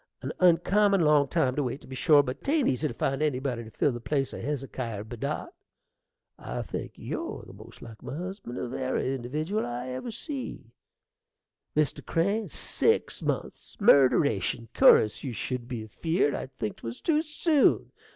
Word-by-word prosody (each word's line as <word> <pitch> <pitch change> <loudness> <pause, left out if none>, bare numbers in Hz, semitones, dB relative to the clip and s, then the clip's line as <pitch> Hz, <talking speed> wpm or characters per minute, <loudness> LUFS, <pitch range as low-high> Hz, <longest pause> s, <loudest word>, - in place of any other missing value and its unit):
an - - -3
uncommon 195 +3 +4
long 150 -2 +4
time 130 -1 +1
to 150 - +1
wait, 130 0 -2
to - - -16
be 130 0 -8
sure; 150 0 +5
but 125 -1 -6
'tain't 290 -2 +2
easy 140 +4 +1
to - - -5
find 135 +1 -1
anybody 130 -5 -1
to 110 - -10
fill 140 - +1
the 120 - -5
place 135 +2 -1
o' - - -6
Hezekier 130 -7 -4
Bedott. 110 +1 -4 0.9
I - - -4
think - - -6
you're - - -5
the - - -12
most - - -13
like 110 -1 -11
husband 175 - -6
of 125 - -4
ary 130 0 -1
individdiwal 155 - -2
I 125 +1 -4
ever 130 - -5
see, 265 +3 -6 1.1
Mr. 150 -2 +1
Crane. 200 +4 0
Six - - 0
months! - - -4
murderation! 115 - +4
cur'us 105 - +5
you 130 -4 -3
should 120 +2 -4
be 120 -4 -4
afeard 160 - 0
I'd 130 - -6
think 105 - -3
'twas 115 +1 -7
too 310 -2 +2
soon. 305 -1 +2
135 Hz, 165 wpm, -28 LUFS, 125-175 Hz, 1.1 s, sure